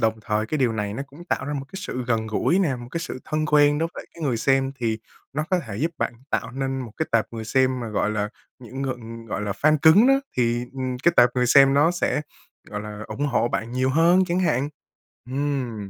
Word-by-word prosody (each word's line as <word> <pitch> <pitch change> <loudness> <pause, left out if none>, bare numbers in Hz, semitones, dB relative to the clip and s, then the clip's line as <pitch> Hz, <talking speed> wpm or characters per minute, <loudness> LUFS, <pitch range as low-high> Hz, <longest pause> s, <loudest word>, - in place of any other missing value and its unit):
đồng 110 0 +2
thời 105 +1 -1
cái 155 - -2
điều 125 -4 +2
này 105 -2 -3
nó 135 - -3
cũng 150 +5 -13
tạo - - -1
ra 145 - -3
một 135 -1 -3
cái - - -22
sự 130 -11 -4
gần 110 -2 0
gũi 140 - +1
nè, 150 -10 +1
một 120 0 -9
cái 170 - -3
sự 150 - -5
thân 155 0 -1
quen 145 0 +4
đối 165 - 0
với - - -6
lại - - -20
cái 165 - -10
người 130 -5 +1
xem 135 +3 +2
thì 115 -3 -1 0.3
nó 155 +2 -1
có 185 - +3
thể 100 -2 -6
giúp 160 +7 0
bạn - - -1 0.2
tạo 115 - -1
nên 135 +1 -3
một 115 -4 -7
cái 160 - -1
tệp 115 -1 +3
người 115 -1 -5
xem 130 +2 +1
mà, 115 - -4
gọi 105 0 0
là, 105 -1 -1 0.3
những 130 +2 -7
ngừ 130 -2 -1 0.3
gọi 105 - -3
là 100 -1 -1
fan 155 +9 +3
cứng 180 +10 +7
đó, 270 - +6 0.2
thì, 120 0 +1
ừm, 130 -1 -3
cái 170 - +5
tệp 125 0 +7
người 125 -1 +2
xem 135 +2 +6
nó 150 +4 +5
sẽ, 175 -3 0 0.5
gọi 105 0 -5
là, 105 0 -7
ủng 145 +1 -2
hộ 120 -4 +1
bạn 115 +1 -3
nhiều 130 +1 +1
hơn 170 +5 +4
chẳng 175 0 -1
hạn. 140 -5 +1 0.6
Ừm, 130 -7 -2
130 Hz, 255 wpm, -24 LUFS, 115-150 Hz, 0.6 s, cứng